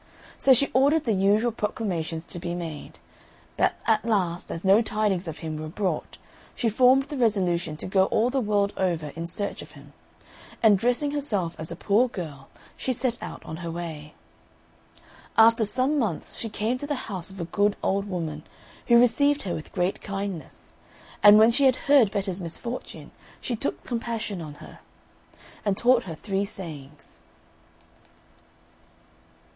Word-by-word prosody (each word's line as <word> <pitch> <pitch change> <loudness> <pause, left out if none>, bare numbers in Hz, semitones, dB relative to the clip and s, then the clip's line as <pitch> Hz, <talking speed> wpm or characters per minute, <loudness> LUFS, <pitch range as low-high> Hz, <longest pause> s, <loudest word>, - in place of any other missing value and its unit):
So 270 - +4
she 265 +2 +5
ordered 285 +4 +3
the 230 - +1
usual 205 +5 +2
proclamations 175 -7 -3
to 175 - -8
be 175 0 -4
made; 165 -4 -7 0.6
but - - +2
at 220 -1 +2
last, 185 -6 -1
as 165 - -5
no 195 +4 +6
tidings 210 -5 -1
of 160 - -5
him 155 -1 -4
were 155 0 -5
brought, 175 0 -3 0.4
she 240 -4 0
formed 255 +4 +5
the 290 +1 -7
resolution 180 -9 +1
to - - -5
go 190 0 +3
all 230 +5 +1
the 265 0 0
world 205 -2 +1
over 170 -5 -1
in 165 +3 -6
search 200 +4 -3
of - - -13
him, - - -15 0.7
and 215 -2 +7
dressing 245 +6 +1
herself 210 - -1
as 160 +1 -2
a - - -4
poor 210 +7 +2
girl, 155 - -8 0.3
she 260 - -2
set 245 0 -1
out - - -8
on 160 - -6
her 170 0 -6
way. 160 -3 -7 1.2
After 225 0 +6
some 260 +7 +2
months 225 -5 -2
she 225 - -3
came 220 +4 -2
to 285 - -5
the 290 -3 -3
house 190 -3 -4
of 190 0 -9
a 170 - -3
good 205 +4 +1
old 195 +1 0
woman, 165 -6 -4 0.5
who 235 - +6
received 285 +4 +3
her 185 - -3
with 155 - -7
great 180 0 -1
kindness; 195 -6 -6 0.5
and 205 +1 +9
when 220 +2 +6
she 275 +4 +3
had 260 -1 +5
heard 275 -7 +4
Betta's 195 -2 -3
misfortune, 210 +9 -4 0.3
she 245 - -3
took 250 - -3
compassion 230 -5 -4
on 150 -2 -8
her, - - -13 0.8
and 200 -2 0
taught 245 0 +3
her 165 -4 -6
three 195 +3 -2
sayings. 150 -8 -8
200 Hz, 165 wpm, -25 LUFS, 170-235 Hz, 1.2 s, and